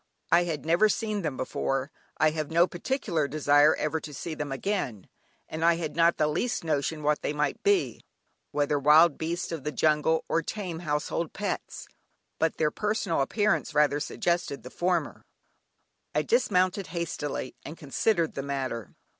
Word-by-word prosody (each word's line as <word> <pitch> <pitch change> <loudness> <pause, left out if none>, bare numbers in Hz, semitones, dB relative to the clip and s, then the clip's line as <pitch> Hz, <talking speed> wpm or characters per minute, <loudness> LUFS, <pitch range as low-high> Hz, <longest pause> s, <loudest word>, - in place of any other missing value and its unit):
I 175 +1 +5
had 155 -4 -4
never 170 +7 +4
seen 215 -2 -1
them 150 -6 -3
before 135 +2 -2 0.3
(I 155 - +4
have 155 -1 -3
no 170 +2 +5
particular 175 - -2
desire 145 0 +4
ever 155 +1 -1
to 150 -2 -9
see 165 +4 -5
them 150 -2 -4
again) 135 - -3 0.4
and 160 +1 -4
I 170 0 +5
had 165 -2 -4
not 170 0 +4
the 155 - +2
least 170 +11 -1
notion 155 0 -1
what 150 0 +1
they - - -2
might 150 -1 -1
be; 405 -2 +1 0.5
whether 145 0 0
wild 150 +2 +6
beasts 170 +3 -3
of 160 -5 -4
the 150 - -2
jungle 155 +1 +2
or 165 - +1
tame 180 -1 -5
household 155 0 -2
pets, - - -4 0.5
but 160 - +1
their 150 -1 +2
personal 210 -7 -1
appearance 205 +1 0
rather 150 -1 +3
suggested 170 -1 -1
the 125 - -9
former. 175 -3 -1 0.9
I - - +2
dismounted 190 - +2
hastily, 155 -5 -4
and 160 - -8
considered 165 +4 0
the 135 - -3
matter. 130 -6 -4
160 Hz, 165 wpm, -27 LUFS, 145-175 Hz, 0.9 s, wild